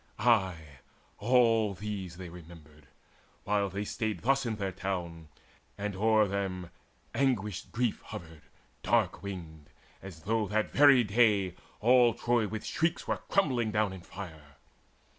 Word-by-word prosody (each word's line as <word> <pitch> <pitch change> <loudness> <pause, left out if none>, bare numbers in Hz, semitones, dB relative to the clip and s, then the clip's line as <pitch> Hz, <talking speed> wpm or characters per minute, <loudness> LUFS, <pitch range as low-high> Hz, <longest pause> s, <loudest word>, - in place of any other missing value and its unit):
Ay, 105 -5 +3 0.6
all 115 -2 +3
these 95 -3 -5
they 90 -1 -7
remembered, 80 -3 -14 0.6
while 100 -1 +1
they 100 +3 -4
stayed 110 -4 -3
Thus 135 +1 +2
in 110 - -1
their 100 -2 -3
town, 90 -4 -4 0.5
and 100 -1 -3
o'er 110 +1 +3
them 95 -3 -3 0.4
anguished 105 -8 -1
grief 120 -2 -1
Hovered 80 -2 -9 0.4
dark - - +1
winged, 80 -6 -8 0.3
as 90 -4 -10
though 110 0 0
that 110 +2 0
very 140 -3 +7
day 105 -4 +3 0.3
All 120 0 +5
Troy 120 -2 +1
with 110 +1 -5
shrieks 165 +1 -1
were - - 0
crumbling 130 - +2
down 105 -2 0
in 95 - -9
fire. 80 -6 -10
100 Hz, 135 wpm, -30 LUFS, 90-115 Hz, 0.6 s, very